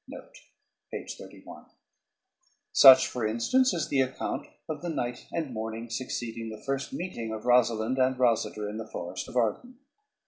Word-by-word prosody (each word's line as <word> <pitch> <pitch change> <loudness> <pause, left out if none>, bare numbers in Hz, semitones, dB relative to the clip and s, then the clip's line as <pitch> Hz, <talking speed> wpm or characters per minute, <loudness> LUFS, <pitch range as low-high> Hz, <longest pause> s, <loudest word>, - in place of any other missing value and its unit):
" - - -25 2.6
Such, 130 -1 +9
for 125 - -4
instance, 250 - +2
is 165 -3 -2
the 135 - +3
account 130 0 -3 0.2
of 155 -2 -5
the 175 - -4
night 125 -6 -4
and 155 -6 -3
morning 110 +1 -5
succeeding 115 -2 -4
the 110 -1 -9
first 135 0 -2
meeting 140 -11 -5
of 110 -1 -5
Rosalynde 120 0 +3
and 130 0 +3
Rosader 115 -4 +1
in 105 +1 -5
the 110 0 -6
Forest 90 -2 -6
of - - -11
Arden. 125 - -1
120 Hz, 145 wpm, -28 LUFS, 110-135 Hz, 2.6 s, Such